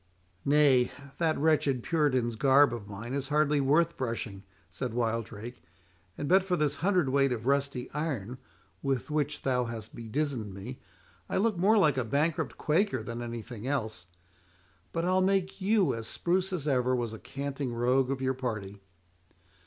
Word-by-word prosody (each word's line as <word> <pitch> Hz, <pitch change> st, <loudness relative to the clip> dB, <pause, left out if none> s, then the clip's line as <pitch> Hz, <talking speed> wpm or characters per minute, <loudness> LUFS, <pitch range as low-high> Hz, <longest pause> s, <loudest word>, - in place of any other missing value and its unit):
"Nay, 140 Hz, -4 st, +5 dB, 0.3 s
that 160 Hz, -2 st, +2 dB
wretched 145 Hz, -5 st, +2 dB
puritan's 130 Hz, -8 st, +1 dB
garb 135 Hz, +3 st, +5 dB
of 110 Hz, -4 st, -6 dB
mine 105 Hz, +5 st, -6 dB
is 140 Hz, -1 st, -2 dB
hardly 150 Hz, 0 st, +2 dB
worth 160 Hz, +5 st, +2 dB
brushing," 115 Hz, -5 st, -3 dB, 0.3 s
said 85 Hz, +6 st, -4 dB
Wildrake; 115 Hz, 0 st, -3 dB, 0.6 s
"and 145 Hz, -, -3 dB
but 185 Hz, +3 st, +5 dB
for 185 Hz, -1 st, 0 dB
this 145 Hz, -2 st, 0 dB
hundred 180 Hz, -3 st, +2 dB
weight 135 Hz, 0 st, +3 dB
of 115 Hz, -2 st, -3 dB
rusty 140 Hz, -2 st, 0 dB
iron, 130 Hz, -6 st, -3 dB, 0.4 s
with 135 Hz, +1 st, -1 dB
which 150 Hz, -1 st, -1 dB
thou 125 Hz, -2 st, +1 dB
hast 115 Hz, -2 st, -7 dB
bedizened 115 Hz, -3 st, -3 dB
me, 120 Hz, +7 st, -7 dB, 0.5 s
I -, -, 0 dB
look 215 Hz, +1 st, +2 dB
more 200 Hz, +6 st, +4 dB
like 150 Hz, -9 st, +4 dB
a -, -, +1 dB
bankrupt 145 Hz, +7 st, 0 dB
Quaker 160 Hz, -, +1 dB
than 115 Hz, +1 st, -5 dB
anything 120 Hz, 0 st, -6 dB
else. 110 Hz, -10 st, -2 dB, 0.8 s
But 165 Hz, 0 st, -1 dB
I'll 185 Hz, +1 st, +3 dB
make 190 Hz, 0 st, +1 dB
you 195 Hz, -5 st, +3 dB
as 115 Hz, -1 st, -5 dB
spruce 185 Hz, +2 st, 0 dB
as 160 Hz, -5 st, -3 dB
ever 130 Hz, -2 st, +2 dB
was 120 Hz, -3 st, -2 dB
a 110 Hz, -, -8 dB
canting 140 Hz, -1 st, -4 dB
rogue 125 Hz, +2 st, +2 dB
of 135 Hz, -1 st, -2 dB
your 130 Hz, 0 st, +1 dB
party." 105 Hz, -6 st, -5 dB
135 Hz, 160 wpm, -29 LUFS, 120-155 Hz, 0.8 s, Nay